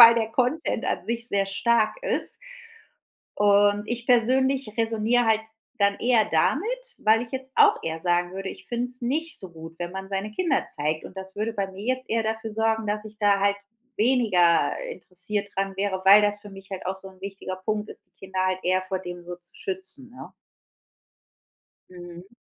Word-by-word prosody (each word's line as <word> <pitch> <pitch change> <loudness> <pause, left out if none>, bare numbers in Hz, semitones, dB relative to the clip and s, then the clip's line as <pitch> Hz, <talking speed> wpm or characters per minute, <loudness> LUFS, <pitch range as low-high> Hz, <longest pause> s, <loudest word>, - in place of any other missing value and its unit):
weil 230 0 +11
der 225 -1 0
Content 255 +7 0
an - - -2
sich 235 0 -3
sehr 200 -4 +1
stark 225 - +2
ist. - - +2 1.0
Und 205 0 +4
ich 240 0 -4
persönlich 260 0 +3
resoniere 230 +1 +2
halt 220 -1 +3 0.4
dann 200 -1 +3
eher 235 -3 +4
damit, - - 0
weil 220 +2 +4
ich 230 - -9
jetzt 265 0 -6
auch 430 -1 +6
eher 160 0 -3
sagen 175 +1 +1
würde, 195 0 -5
ich - - -8
finde 240 +1 -2
es 250 0 -2
nicht 305 +7 0
so 190 - -2
gut, 165 0 -11
wenn 175 0 -4
man 190 0 -6
seine 195 +2 -3
Kinder 295 +3 0
zeigt, 155 +1 -2
und - - -11
das 190 +1 -7
würde 220 +2 -1
bei 200 -3 -2
mir 190 +1 -11
jetzt 255 0 -10
eher 225 0 +1
dafür 220 0 -3
sorgen, 225 0 0
dass 210 +1 -2
ich 215 0 -11
da 205 -2 +4
halt 200 0 +2 0.4
weniger 210 -8 +3 0.2
interessiert 200 - -3
daran 195 0 -1
wäre, 195 -1 -1
weil 200 +2 +8
das 205 0 +1
für 205 0 -7
mich 195 0 -13
halt 190 -1 -6
auch 190 +1 -2
so 190 0 -11
'n 190 -1 -18
wichtiger 195 -1 -6
Punkt 215 0 -1
ist, - - -11
die - - -48
Kinder 190 0 -1
halt 185 0 0
eher 185 +1 +2
vor 185 0 -3
dem 175 -1 -8
so 175 0 -7
zu 175 0 -21
schützen, 370 -10 -5
ne? 255 - -11 1.6
Mhm. 175 0 -11
210 Hz, 195 wpm, -25 LUFS, 190-235 Hz, 1.6 s, weil